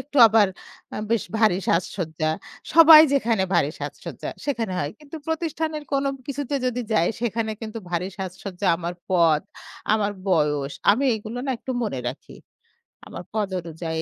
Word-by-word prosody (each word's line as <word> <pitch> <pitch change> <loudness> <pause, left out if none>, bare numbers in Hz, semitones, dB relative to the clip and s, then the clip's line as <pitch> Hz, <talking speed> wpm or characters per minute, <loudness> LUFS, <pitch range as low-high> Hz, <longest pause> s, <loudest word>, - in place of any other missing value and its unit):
একটু 285 +3 -9
আবার 215 -2 +4 0.4
অ্যা - - -5
বেশ 230 -3 +1
ভারী 215 -5 +4
সাজসজ্জা। 160 -3 -1 0.4
সবাই 325 -1 +10
যেখানে 230 -7 +2
ভারী 150 -4 +3
সাজসজ্জা - - -6 0.2
সেখানে 230 -8 -1
হয়। 145 +1 -2
কিন্তু 300 +1 -10
প্রতিষ্ঠানের 320 -1 -2
কোনো 275 0 +1 0.2
কিছুতে 285 0 -3
যদি 250 0 -1
যাই 170 -5 +3
সেখানে 230 -1 -1
কিন্তু 225 +1 -5
ভারী 175 +1 -1
সাজসজ্জা 190 +1 -5
আমার 175 0 -4 0.2
পদ, 165 -4 +4 0.5
আমার 205 -1 0 0.2
বয়স। 150 -5 +1 0.2
আমি 255 +7 +2
এগুলো 220 +3 -7
না - - 0
একটু 260 - -5
মনে 135 -11 -3
রাখি। 130 - -9 0.7
আমার - - -8
পদ 215 -2 0
অনুযায়ী, 160 -1 -4
210 Hz, 150 wpm, -24 LUFS, 170-260 Hz, 0.7 s, সবাই